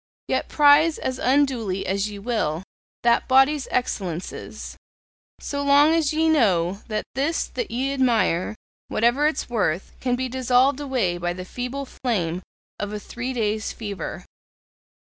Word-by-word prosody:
Yet -, -, -1 dB
prize 300 Hz, +2 st, +5 dB
as 260 Hz, 0 st, -3 dB
unduly 250 Hz, -8 st, +1 dB
as 200 Hz, +2 st, 0 dB
ye 205 Hz, -, -8 dB
will 200 Hz, -7 st, -1 dB, 0.4 s
that 235 Hz, 0 st, +3 dB
body's 270 Hz, +2 st, +4 dB
excellences; 185 Hz, -8 st, -4 dB, 0.6 s
so 285 Hz, 0 st, -3 dB
long 285 Hz, +2 st, +5 dB
as 320 Hz, -3 st, +2 dB
ye 320 Hz, +1 st, +2 dB
know 195 Hz, -, +2 dB
that 215 Hz, -2 st, -2 dB
this 285 Hz, +6 st, 0 dB
that 485 Hz, -, -5 dB
ye 265 Hz, +3 st, -1 dB
admire, 230 Hz, -8 st, +1 dB, 0.3 s
whatever 240 Hz, +7 st, +2 dB
its 305 Hz, -, -2 dB
worth, 195 Hz, -7 st, -1 dB
can 250 Hz, -1 st, 0 dB
be 260 Hz, +1 st, -2 dB
dissolved 255 Hz, +2 st, +2 dB
away 245 Hz, -12 st, -1 dB
by 175 Hz, 0 st, -1 dB
the 180 Hz, 0 st, -7 dB
feeble 250 Hz, +6 st, -5 dB
flame 185 Hz, -10 st, -2 dB, 0.4 s
of 205 Hz, 0 st, -3 dB
a 210 Hz, -, -4 dB
three 245 Hz, +4 st, -5 dB
days' 220 Hz, -3 st, -1 dB
fever. 200 Hz, -6 st, -6 dB
245 Hz, 145 wpm, -23 LUFS, 200-275 Hz, 0.6 s, prize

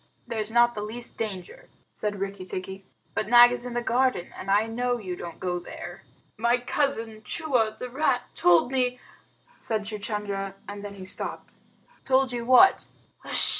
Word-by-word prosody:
"There's 220 Hz, -2 st, -3 dB
not 240 Hz, +1 st, +4 dB
the 210 Hz, -, -5 dB
least 230 Hz, +3 st, -7 dB
danger," 195 Hz, -6 st, -6 dB, 0.2 s
said 205 Hz, -2 st, -3 dB
Rikki 195 Hz, -1 st, -4 dB
tikki. 190 Hz, +1 st, -7 dB, 0.3 s
"But 215 Hz, -, -1 dB
Nag 240 Hz, +1 st, +8 dB
is 245 Hz, 0 st, -3 dB
in 245 Hz, -, -6 dB
the 240 Hz, -, -1 dB
garden, 245 Hz, -5 st, +1 dB
and 195 Hz, -, -7 dB
I 205 Hz, +2 st, +4 dB
know 245 Hz, +2 st, -1 dB
you 185 Hz, -6 st, -5 dB
don't 170 Hz, -2 st, -8 dB
go 180 Hz, -1 st, -2 dB
there." 175 Hz, -, -9 dB, 0.4 s
"My 235 Hz, +2 st, +3 dB
cousin 235 Hz, -4 st, -1 dB
Chua, 230 Hz, -4 st, 0 dB
the 250 Hz, -, -5 dB
rat, 255 Hz, -1 st, +1 dB
told 175 Hz, +7 st, +4 dB
me 250 Hz, -1 st, 0 dB, 0.3 s
" -, -, -33 dB
said 220 Hz, -2 st, -2 dB
Chuchundra, 205 Hz, -2 st, -4 dB
and 205 Hz, 0 st, -7 dB
then 205 Hz, -1 st, -7 dB
he 190 Hz, -1 st, -9 dB
stopped. 190 Hz, -, -2 dB, 0.5 s
"Told 265 Hz, 0 st, +2 dB
you 235 Hz, -1 st, -3 dB
what?" 255 Hz, +10 st, +6 dB
220 Hz, 170 wpm, -26 LUFS, 200-245 Hz, 0.5 s, Nag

